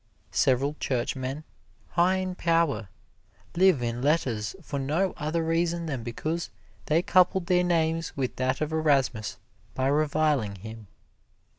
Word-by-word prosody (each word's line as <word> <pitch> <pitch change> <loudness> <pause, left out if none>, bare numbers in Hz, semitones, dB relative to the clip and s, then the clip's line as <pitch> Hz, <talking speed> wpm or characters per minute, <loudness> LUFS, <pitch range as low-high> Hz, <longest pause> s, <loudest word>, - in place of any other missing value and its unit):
Several 135 +3 +2
Churchmen, 130 +3 -2 0.5
high 180 +2 +3
in 185 -1 -2
power, 165 - +1 0.7
live 180 -7 +4
in 120 +1 -2
letters 130 - 0
for 145 -5 -5
no 160 +8 0
other 155 +2 -1
reason 170 +1 0
than 140 -6 -3
because 155 +9 -3 0.4
they 160 +3 +3
coupled 185 0 +3
their 180 0 +3
names 165 -2 0
with 130 -2 -2
that 130 +2 0
of 155 0 -1
Erasmus 135 -10 +1 0.4
by 130 - 0
reviling 145 -6 +1
him. 110 +2 -10
150 Hz, 130 wpm, -27 LUFS, 130-170 Hz, 0.7 s, live